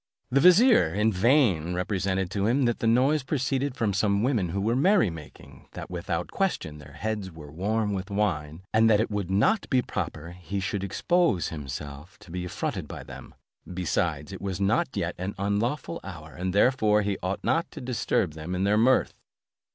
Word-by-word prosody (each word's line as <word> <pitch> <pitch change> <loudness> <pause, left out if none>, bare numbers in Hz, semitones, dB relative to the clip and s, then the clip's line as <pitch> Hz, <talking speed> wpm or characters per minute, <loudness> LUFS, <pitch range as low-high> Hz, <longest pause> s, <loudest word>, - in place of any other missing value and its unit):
The 135 - +4
vizier, 180 - +6
in 105 +1 +2
vain 95 - +3
represented 95 0 -1
to 100 0 0
him 130 +3 +2
that 120 -1 0
the 115 - 0
noise 130 +6 +3
proceeded 135 0 -1
from 105 -3 0
some 100 +1 +1
women 115 -9 +1
who 95 +4 -2
were 110 +4 +1
merry 170 - +3
making, 80 -3 -12
that - - -8
without 85 -1 -3
question 80 - -2
their 70 -1 -13
heads 105 +4 -3
were 80 -4 -12
warm 105 +5 -1
with 95 +1 -4
wine, 85 -5 -2
and 110 +1 +5
that 105 -2 +5
it 110 - 0
would 100 -3 -2
not 110 - +2
be 130 -2 +2
proper 85 -4 -5
he 90 +3 -5
should 95 0 -2
expose 165 - +1
himself 75 +2 -7
to 85 - -14
be 90 0 -4
affronted 90 - -4
by - - -8
them: - - -11 0.4
besides, 85 -2 -2
it 95 - -8
was 95 -2 -3
not 100 +2 +2
yet - - -1
an 95 +3 -4
unlawful 110 - -1
hour, 80 -4 -9
and 90 +1 -3
therefore 105 0 +3
he 100 -1 -2
ought 95 +2 -3
not 165 - +1
to - - -9
disturb 120 -9 -1
them 80 +4 -5
in 90 - -1
their 105 +2 +3
mirth. 130 +3 +3
100 Hz, 190 wpm, -26 LUFS, 90-115 Hz, 0.4 s, vizier